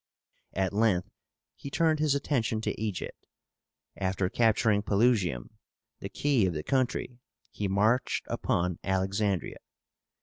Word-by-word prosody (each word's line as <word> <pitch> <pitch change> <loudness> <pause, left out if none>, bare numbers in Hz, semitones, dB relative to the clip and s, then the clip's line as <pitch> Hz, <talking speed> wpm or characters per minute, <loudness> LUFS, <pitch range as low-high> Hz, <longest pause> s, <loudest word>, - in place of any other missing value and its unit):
At 95 +1 0
length 100 -4 +1 0.4
he 140 - -8
turned 160 +1 +2
his 150 -2 +2
attention 125 -6 0
to 110 - -3
Egypt. 105 -4 -4 0.7
After 95 -1 -1
capturing 110 -2 +3
Pelusium, 100 - +1 0.5
the - - -6
key 135 -9 +2
of 90 - -2
the 75 - -3
country, 130 - -1 0.3
he 105 - -2
marched 105 +6 +1
upon 90 -1 -1
Alexandría. 95 0 0
105 Hz, 115 wpm, -29 LUFS, 95-125 Hz, 0.7 s, capturing